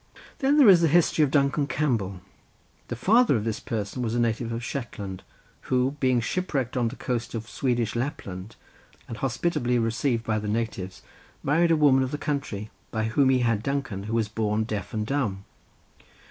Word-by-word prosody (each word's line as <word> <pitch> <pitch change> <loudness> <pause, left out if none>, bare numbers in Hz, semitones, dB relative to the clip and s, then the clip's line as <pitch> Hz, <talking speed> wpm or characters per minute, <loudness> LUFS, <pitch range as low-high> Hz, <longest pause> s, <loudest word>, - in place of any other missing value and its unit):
Then 280 +2 +3
there 280 -6 +7
is 185 -4 +8
the 165 - +4
history 160 0 +4
of 145 - +2
Duncan 140 0 +2
Campbell. 110 -13 -1 0.7
The 120 - -4
father 220 - +4
of 110 - 0
this 110 -1 -2
person 110 +2 -4
was 115 -1 -1
a - - +1
native 115 0 0
of 115 +1 -4
Shetland, 105 -8 -5 0.5
who 130 +2 +2
being 130 -2 +3
shipwrecked 135 -3 -2
on 120 -2 +1
the 120 - -5
coast 120 -3 -3
of 115 0 -5
Swedish 120 -4 -1
Lapland, 110 -6 -4 0.5
and 115 - -6
hospitably 130 -1 0
received 115 +1 0
by 110 -2 0
the 105 - -5
natives, 105 -4 -3 0.4
married 165 +5 +3
a 165 - +5
woman 140 -3 +5
of 130 - 0
the 150 - -3
country, 140 -9 -3 0.2
by 110 -1 -2
whom 130 +4 +3
he 130 -1 +3
had 115 -3 +1
Duncan, 135 -7 -3
who 110 - -4
was 115 -2 +1
born 105 0 0
deaf 105 -2 -4
and 110 -1 -2
dumb. 110 -7 -2
120 Hz, 185 wpm, -26 LUFS, 110-140 Hz, 0.7 s, is